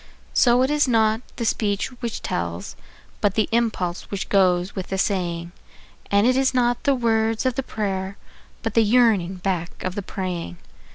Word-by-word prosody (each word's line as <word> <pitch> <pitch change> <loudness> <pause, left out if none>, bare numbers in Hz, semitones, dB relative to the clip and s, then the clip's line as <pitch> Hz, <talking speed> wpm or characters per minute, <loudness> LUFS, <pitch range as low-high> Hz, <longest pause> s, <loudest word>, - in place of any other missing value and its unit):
So 245 0 +4
it 265 - +1
is 295 -2 +3
not 220 -2 +3
the 235 - -3
speech 205 -3 0
which 235 -2 -4
tells, - - -3 0.5
but 205 -2 +2
the 215 - +2
impulse 215 -7 -1
which 200 -1 -4
goes 185 -1 +2
with 190 -2 -4
the 190 - -3
saying; 175 -4 -1 0.6
And 200 +1 +4
it 255 +1 +4
is 265 0 +2
not 245 +2 +1
the 280 -1 +4
words 225 -1 +1
of 255 - +2
the 270 - -1
prayer, 195 -5 -3 0.5
but 225 -2 -2
the 230 - +5
yearning 215 -5 +3
back 180 -2 -3
of 185 - -2
the 205 - -3
praying. 180 - -5
210 Hz, 175 wpm, -23 LUFS, 190-235 Hz, 0.6 s, the